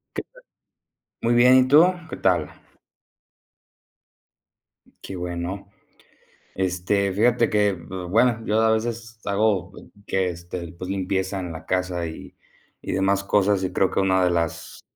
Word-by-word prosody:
¿Qué - - -2
tal? - - -21 0.8
Muy 115 +1 +2
bien, 125 +2 +6
¿y 130 0 +4
tú? 150 +5 +7 0.3
¿Qué - - -5
tal? - - +1 2.6
Qué 95 - -6
bueno, 90 +3 -5 0.9
este, 95 +1 0
fíjate 115 +3 +2
que, 105 -1 +2
bueno, 95 +7 0
yo 110 +1 +1
a 110 - +3
veces 115 +1 -3
hago 100 -2 0 0.3
que, 95 -2 0
este, 85 0 -6
pues 90 +1 -8
limpieza 95 0 -2
en 90 -2 -5
la 80 - -9
casa, 90 -2 -1
y 80 -1 -9 0.5
y - - -5
demás 100 +1 +1
cosas, 100 -1 +2
y 95 - -2
creo 95 - +2
que - - 0
una 95 -1 +2
de - - +3
las 85 -2 -3
95 Hz, 140 wpm, -23 LUFS, 90-110 Hz, 2.6 s, tú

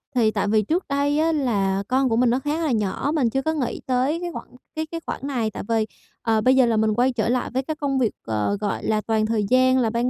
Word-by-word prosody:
thì 225 -3 +3
tại 205 -1 -1
vì 215 +1 +3
trước 330 - -1
đây 285 +1 +1
á 325 +1 +2
là 200 -10 0
con 260 +1 +2
của 225 - +1
mình 245 +1 +3
nó 245 +2 +2
khá 295 +4 -2
là 305 - 0
nhỏ, 215 +5 -1
mình 260 -7 +2
chưa 270 +4 -1
có 315 +3 -1
nghĩ 280 -6 -2
tới 260 +5 +1
cái 350 -1 -4
khoản - - -8 0.3
cái 315 0 -2
cái 335 - -3
khoản - - -4
này. 235 -6 -1
Tại - - -6
vì, 225 -1 +2 0.4
ờ, 225 -1 +1
bây 255 +4 +4
giờ 260 -1 +5
là 230 -2 +1
mình 215 0 +2
quay 245 +4 +2
trở 225 -2 0
lại 250 0 0
với 260 +1 0
cái 310 +3 -4
công 280 -3 -1
việc, 235 -4 +2 0.2
ờ, 110 - 0
gọi 205 - -2
là 215 -1 +1
toàn 220 0 0
thời 220 -1 0
gian 255 0 +4
là 235 -3 +2
ban 235 +2 0
250 Hz, 280 wpm, -23 LUFS, 220-280 Hz, 0.4 s, giờ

